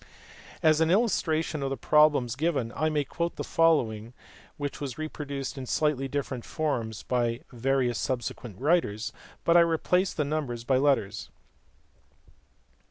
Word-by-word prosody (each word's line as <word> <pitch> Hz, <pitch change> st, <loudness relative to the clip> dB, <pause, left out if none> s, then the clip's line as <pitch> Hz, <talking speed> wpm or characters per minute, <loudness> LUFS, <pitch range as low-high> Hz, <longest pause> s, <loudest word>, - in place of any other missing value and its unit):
As 155 Hz, 0 st, +4 dB
an 160 Hz, -, +3 dB
illustration 165 Hz, -7 st, +1 dB
of 135 Hz, -, -1 dB
the 135 Hz, -, -3 dB
pro 150 Hz, +5 st, +5 dB
blems 125 Hz, -5 st, -2 dB
given 140 Hz, -6 st, -1 dB
I 155 Hz, +2 st, +1 dB
may 150 Hz, -2 st, 0 dB
quote 170 Hz, +5 st, -3 dB
the -, -, -4 dB
following, 120 Hz, -9 st, +1 dB, 0.4 s
which 145 Hz, 0 st, -4 dB
was 135 Hz, -4 st, -4 dB
reproduced 145 Hz, -3 st, -5 dB
in 130 Hz, -, -6 dB
slightly 145 Hz, -2 st, +1 dB
different 135 Hz, -3 st, -3 dB
forms 120 Hz, -9 st, -3 dB
by 120 Hz, -1 st, 0 dB
various 125 Hz, -1 st, 0 dB
subsequent 120 Hz, -4 st, -4 dB
writers, 135 Hz, -7 st, +1 dB, 0.3 s
but 170 Hz, -, +3 dB
I -, -, +9 dB
replace 170 Hz, +3 st, +2 dB
the 150 Hz, -, -1 dB
numbers 140 Hz, -6 st, -3 dB
by 130 Hz, +1 st, +2 dB
letters. 135 Hz, -8 st, +1 dB
140 Hz, 145 wpm, -28 LUFS, 125-155 Hz, 0.4 s, I